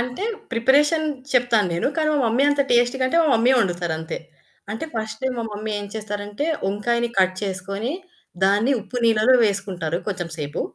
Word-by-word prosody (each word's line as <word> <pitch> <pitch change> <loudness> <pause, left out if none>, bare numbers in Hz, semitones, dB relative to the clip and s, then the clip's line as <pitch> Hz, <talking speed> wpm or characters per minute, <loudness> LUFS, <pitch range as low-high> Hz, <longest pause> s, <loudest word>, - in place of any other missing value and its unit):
అంటే 250 +10 -3 0.3
ప్రిపరేషన్ 290 +7 +3 0.3
చెప్తాను 235 -6 +3
నేను. 170 - 0
కానీ 310 -1 +1
మా - - +2
మమ్మీ 230 +4 +2
అంత 285 0 +1
టేస్ట్‌గంటే 255 +4 +2
మా - - +2
మమ్మీయే 245 +4 +4
వండుతారంతే. 175 -5 -2 0.5
అంటే 225 - -4
ఫస్టే 225 +4 -3
మా - - -1
మమ్మీ 215 +1 -5
ఏం 205 - -6
చేస్తారంటే 205 +4 -4 0.2
వంకాయని 235 +4 0
కట్ 185 0 +3
చేసుకొని 195 +6 -3 0.5
దాన్ని 205 +7 +3
ఉప్పు 245 - -8
నీళ్ళల్లో 225 +2 +4
వేసుకుంటారు 190 -5 -1
కొంచెం 180 -4 -3
సేపు. 145 -1 -4
220 Hz, 150 wpm, -22 LUFS, 195-250 Hz, 0.5 s, మమ్మీయే